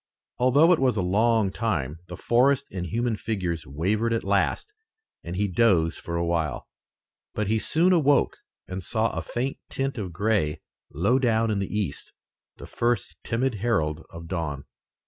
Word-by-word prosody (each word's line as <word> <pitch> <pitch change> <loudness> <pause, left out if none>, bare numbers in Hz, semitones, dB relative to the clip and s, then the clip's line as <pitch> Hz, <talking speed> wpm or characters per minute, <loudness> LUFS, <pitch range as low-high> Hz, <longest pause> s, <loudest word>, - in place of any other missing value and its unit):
Although 140 +8 +5
it 165 - +1
was 130 -4 +2
a - - +2
long 105 +2 +2
time, 85 - -2
the 90 0 -8
forest 135 +6 +3
and 90 -2 -4
human 115 +3 0
figures 95 - -3
wavered 105 - 0
at 115 - -1
last, 100 - 0 0.5
and 85 +1 -5
he 100 +2 +1
dozed 90 -5 +2
for 85 - -5
a 85 0 0
while. 85 -4 -1 0.7
But 105 - 0
he 110 +2 +1
soon 170 +10 +3
awoke 145 -4 +3 0.3
and 95 +1 -5
saw 110 +5 0
a - - -3
faint 130 +3 -3
tint 135 -2 -2
of 95 -4 -4
gray 95 -4 0 0.3
low 100 - +2
down 115 -3 +2
in 100 - 0
the 100 - -3
east, 105 -9 -3 0.4
the - - -10
first 120 -4 -1
timid 125 +2 0
herald 80 -9 0
of 85 0 -10
dawn. 80 -6 -3
105 Hz, 165 wpm, -25 LUFS, 85-120 Hz, 0.7 s, Although